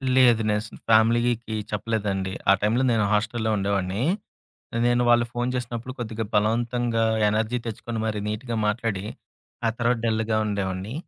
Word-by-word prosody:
లేదు. 120 -3 +5
నేను 105 0 +1
అస్ 110 - -9 0.2
ఫ్యామిలీకి 115 0 +3 0.2
చెప్పలేదండి. 100 -3 -2 0.2
ఆ - - +8
టైంలో 115 +5 +2
నేను 110 -3 +2
హాస్ట‌లులో 110 +1 0
ఉండేవాడిని. 100 +1 -1 0.9
నేను 120 0 +3
వాళ్ళు 120 0 +5
ఫోను 120 +1 -1
చేసినప్పుడు, 125 0 -4
కొద్దిగా 115 -1 -3
బలవంతంగా 115 +2 +1 0.3
ఎనర్జీ 110 +3 0
తెచ్చుకొని 115 +1 -4
మరి 105 -1 -2
నీట్‌గా 115 +2 -3
మాట్లాడి, 105 -3 -1 0.6
ఆ - - +3
తర్వాత 120 0 +2
డల్‌గా 110 0 0
ఉండేవాడిని. 100 +1 -3
110 Hz, 135 wpm, -25 LUFS, 105-120 Hz, 0.9 s, ఆ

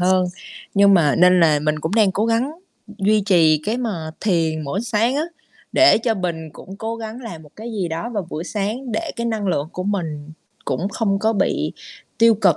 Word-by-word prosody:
hơn. 185 0 +3 0.5
Nhưng 200 0 +6
mà 150 -5 +4
nên 180 +1 +6
là 155 -3 +5
mình 155 0 0
cũng 160 +7 -2
đang 210 -4 +4
cố 215 +4 0
gắng 230 +5 +1 0.4
d 210 - -12
duy 210 +2 +3
trì 160 -5 +5
cái 220 +3 0
mà 185 -11 -3
thiền 165 -5 0
mỗi 185 +9 -2
sáng 230 +3 +1
á, 300 - +1 0.5
để 330 -7 +6
cho 225 0 0
bình 170 -5 -4
cũng 190 +6 -11
cố 225 +2 -4
gắng 225 +2 -7
làm 175 -9 -8
một 150 - -16
cái 230 +2 -7
gì 190 -6 -2
đó 165 +9 -4
vào 200 -6 -3
buổi 160 +3 -4
sáng 220 +6 -3
để 330 - -2
cái 235 0 -2
năng 220 -3 -2
lượng 155 -5 0
của 185 - -4
mình 155 -7 -3 0.3
cũng 195 - -1
không 200 -2 0
có 220 +2 +1
bị 200 -3 0 0.5
tiêu 230 -1 +6
cực 195 -6 +3
195 Hz, 215 wpm, -21 LUFS, 165-225 Hz, 0.5 s, Nhưng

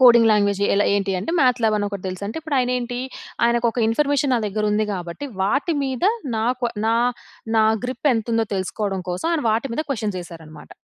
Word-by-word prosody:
Coding 235 -3 +7
language 205 -1 +2
ఎలా 205 - +3
ఏంటి 195 -1 0
అంటే, 265 - -3
మ్యాథ్‌ల్యాబ్ 240 -4 +3
అని 205 -1 0
ఒకటి 200 -2 -7
తెలుసంటే 200 +3 -5
ఇప్పుడు 310 -3 -2
ఆయన 250 -1 +1
ఏంటి? 245 0 -4 0.5
ఆయనకు 235 0 +2
ఒక 240 - -2
ఇన్ఫర్మేషన్ 285 +3 +1
నా - - +3
దగ్గర 210 +1 -2
ఉంది 215 +1 +2
కాబట్టి, 175 +8 -6 0.2
వాటి 280 - +1
మీద 265 +3 -2 0.3
నాకు 240 +2 0 0.2
నా 225 +1 +3 0.6
నా 220 - +5 0.2
గ్రిప్ 255 +3 -1
ఎంతుందో 225 0 0
తెలుసుకోవడం 195 0 -2
కోసం 180 - -3
ఆయన 325 -3 0
వాటి 230 +5 0
మీద 310 - -1
క్వశ్చన్స్ 215 -7 -2
వేశారన్నమాట. 160 -3 -12
225 Hz, 185 wpm, -22 LUFS, 200-250 Hz, 0.6 s, Coding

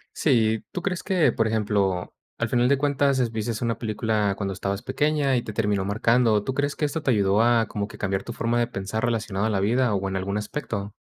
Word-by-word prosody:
Sí, 110 -6 +2
¿tú 180 - -5
crees 180 -3 -1
que, 185 -4 +2
por 115 -1 0
ejemplo, 100 -4 0 0.2
al 120 - -1
final 120 +2 +2
de 140 - +4
cuentas, 140 -1 +1
es 120 -3 +1
viste 110 +1 -2
una 115 -1 -1
película 110 -3 0
cuando 100 -1 -2
estabas 100 +3 -3
pequeña, 145 -2 +1
y - - 0
te 105 - -7
terminó 105 -3 0
marcando? 110 +1 +2
¿Tú 130 - -2
crees 145 +1 -1
que 150 - 0
esto 155 +2 -2
te 140 - -1
ayudó, 100 -2 +3
a 115 -1 +4
como 100 0 -3
que - - -12
cambiar 95 -1 -2
tu 120 - -6
forma 120 +1 0
de 120 - +1
pensar 110 +1 -4
relacionado 110 -3 0
a - - 0
la 100 -3 0
vida, 120 +4 +2
o, 95 0 -1
en 95 - -3
algún 100 +2 -2
aspecto? 105 -3 -4
110 Hz, 235 wpm, -25 LUFS, 100-125 Hz, 0.2 s, de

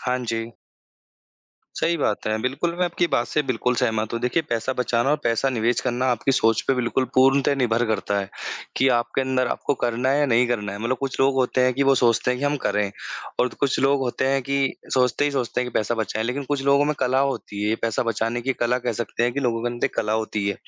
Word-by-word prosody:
हाँ 125 0 -1
जी। 115 0 -3 1.2
सही 170 +1 +1
बात 105 -8 -1
है। 110 - +1
बिल्कुल, 140 +7 -1
मैं 180 - +2
आपकी 175 0 0
बात 120 - +2
से 150 - 0
बिल्कुल 125 -1 0
सहमत 110 -3 0
हूँ। 115 - -2
देखिए 125 +7 +1
पैसा 115 +2 -1
बचाना 125 +2 +1
और 150 - +3
पैसा 115 +3 +1
निवेश 120 -1 +1
करना 125 +1 -1
आपकी 125 +3 +1
सोच 115 -3 +3
पे 135 - +4
बिल्कुल 125 +1 0
पूर्णतः 135 +2 +4
निर्भर 120 -3 +1
करता 100 -2 -1
है 100 - -3 0.5
कि 135 - +4
आपके 120 +3 -1
अंदर 130 -1 0
आपको 145 - -1
करना 120 +2 0
है 140 - +2
या 145 - +3
नहीं 120 0 +3
करना 105 -4 -2
है, 100 - -6
मतलब 120 +3 -1
कुछ 135 -2 -3
लोग 135 0 +4
होते 130 0 +1
हैं 130 - +3
कि 140 - +1
वो 135 0 +4
सोचते 120 0 +2
हैं 125 - -1
कि - - -1
हम 145 +1 +1
करें 105 -1 +1 0.5
और 125 - +3
तो - - -15
कुछ 140 -2 +1
लोग 140 +1 +3
होते 130 0 -1
हैं 135 -1 +1
कि 140 +1 0 0.2
सोचते 125 +2 +2
ही 145 - +1
सोचते 125 -2 -1
हैं 125 0 -2
कि - - -21
पैसा 110 +2 -1
बचाएँ, 110 0 -2
लेकिन 130 +4 -2
कुछ 140 0 -2
लोगों 140 +1 +4
में 150 0 0
कला 130 +1 +1
होती 120 -7 -2
है, 110 - +2
पैसा 115 0 0
बचाने 115 +1 -1
की 135 +2 0
कला 125 0 0
कह 120 -1 -2
सकते 120 +1 -3
हैं 120 0 +2
कि 140 - -2
लोगों 115 -3 0
के 120 - 0
अंदर 120 - -3
एक - - -10
कला 105 0 0
होती 110 -2 -1
है। 100 - -1
125 Hz, 250 wpm, -23 LUFS, 115-135 Hz, 1.2 s, पे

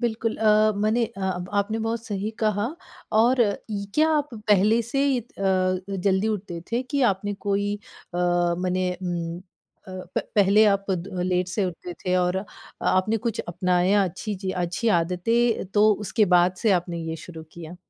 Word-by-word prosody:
बिल्कुल 225 -1 -1
अ, 215 0 +4
मने 225 +3 +2
अ, 190 -5 -3
ब 180 0 -6
आपने 215 +3 -3
बहुत 230 0 -2
सही 205 0 -3
कहा 210 0 +1 0.5
और 245 +3 +3 0.3
ई 200 -1 -3
क्या 310 +1 +4
आप 295 0 -1
पहले 215 +1 +3
से 275 +2 +1
इत 240 -1 -6
अ, 195 - -4
अ, 185 0 0
जल्दी 195 +3 +2
उठते 180 -4 -8
थे 240 +2 +1
कि 280 - +1
आपने 205 +2 -5
कोई 200 0 +1 0.5
अ, - - -1 0.5
मने 185 0 0 0.2
उम, 170 -1 -3
अ, 185 0 -13
प - - +2
पहले 205 +1 +5
आप 195 0 -8
द 185 0 -3
लेट 180 0 +1
से 200 +2 -1
उठते 180 0 -5
थे 185 -1 +2
और 180 0 +1
अ, 190 - -2 0.4
आपने 185 +4 +2
कुछ 230 -1 -1
अपनाया 180 +3 +2
अच्छी 200 +4 -4
ची 190 - 0
अच्छी 180 +7 -1
आदतें 225 +8 +1
तो 215 +1 +6
उसके 215 - +2
बाद 175 +1 +3
से 220 - +5
आपने 170 -1 -6
ये 160 - -4
शुरू 160 -3 -9
किया? 170 +1 -9
195 Hz, 180 wpm, -24 LUFS, 180-215 Hz, 0.5 s, तो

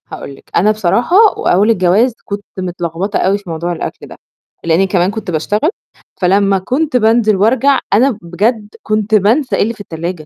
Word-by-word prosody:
هاقول 140 - -9
لِك، - - -21
أنا 205 +5 +3
بصراحة 215 - 0 0.2
وأول 200 +5 +2
الجواز 215 +4 +2
كنت 205 0 -6
متلخبطة 180 +2 -3
أوي 195 +2 +1
في 200 -3 -13
موضوع 165 +2 -3
الأكل 170 - -6
ده، - - -12 0.5
لإن 170 +4 +2
كمان 185 0 +1
كنت 210 -4 -5
باشتغل، 205 - 0 0.5
فلمّا 195 +2 +3
كنت 265 +8 -1
بانزل 220 -2 +3
وأرجع 255 +7 +2
أنا 240 +2 +3
بجد 205 +6 -1 0.2
كنت 215 0 0
بانسى 230 +7 +2
إيه - - 0
اللي 225 +3 -2
في 215 - -12
التلاجة، 170 -2 -6
205 Hz, 170 wpm, -14 LUFS, 180-225 Hz, 0.5 s, أنا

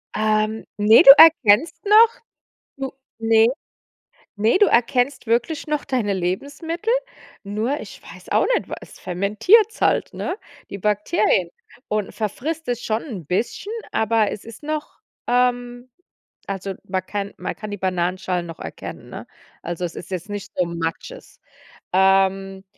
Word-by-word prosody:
Ähm, 215 0 0
ne, 210 +2 +6
du 275 - +12
erkennst 320 0 +5
noch. 440 +3 +5 0.6
Du 270 -1 -5 0.3
ne. 225 0 +4 0.9
Ne, 220 - +2
du 415 - +6
erkennst 245 +1 +1
wirklich 245 +7 -1
noch 300 -1 -1
deine 240 -7 -1
Lebensmittel, 285 - -3 0.5
nur 215 +8 -2
ich - - -11
weiß - - -13
auch - - +3
nicht, - - -4
was - - -5
es - - -14
fermentiert's 215 - +2
halt, - - +1
ne, 365 - -4 0.3
die 200 - -6
Bakterien, 205 -3 +1 0.4
und 210 -2 -2
verfrisst 290 +10 -4
es 245 -1 -3
schon 220 +1 -1
'n 200 - -8
bisschen, 235 - -2 0.2
aber 220 -1 +1
es 210 - -8
ist 230 +4 -12
noch 305 0 -5 0.3
ähm, 245 0 0 0.6
also, 195 0 -4
man 185 -1 -2
kann 200 -1 -4
man - - -5
kann 215 -1 -8
die 205 - -4
Bananenschalen 180 -1 -2
noch 165 -1 -10
erkennen, - - -9
ne? - - -9 0.3
Also, 175 +1 -5
es 170 -1 -4
ist - - -9
jetzt 185 +2 -5
nicht 205 -1 -6
so 180 - +2
Matsches. 170 - -6 0.5
Ähm, 195 0 +2
215 Hz, 145 wpm, -21 LUFS, 195-270 Hz, 0.9 s, du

